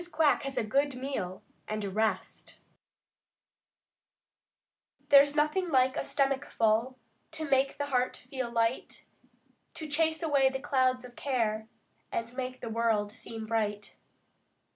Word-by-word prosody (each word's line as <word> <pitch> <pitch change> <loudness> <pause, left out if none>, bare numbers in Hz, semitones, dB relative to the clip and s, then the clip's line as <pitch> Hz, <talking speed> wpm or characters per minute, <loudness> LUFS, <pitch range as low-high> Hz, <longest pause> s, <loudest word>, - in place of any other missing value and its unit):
QUACK 310 -2 +3
HAS 275 -1 -5
A - - +2
GOOD 275 +5 +1
MEAL 250 -9 -4 0.2
AND 215 -1 -3
A - - -2
REST 215 -2 -2 2.5
There's 285 +1 +7
nothing 310 +5 +1
like 260 -3 +3
a - - -1
stomach 275 -1 +1
full 230 +3 +1 0.4
To 315 -1 -2
make 270 0 +2
the 285 - -1
heart 255 -3 0
feel 255 -1 -5
light; 230 +1 -1 0.7
To 315 - -6
chase 320 +2 0
away 280 -4 +4
the 265 - -3
clouds 255 -2 +1
of 245 -1 -13
care 220 -5 -1 0.4
And 230 +1 -3
make 255 -1 -4
the 235 - -5
world 220 -2 +1
seem 225 -1 -7
bright. 210 -2 -2
255 Hz, 135 wpm, -30 LUFS, 225-280 Hz, 2.5 s, There's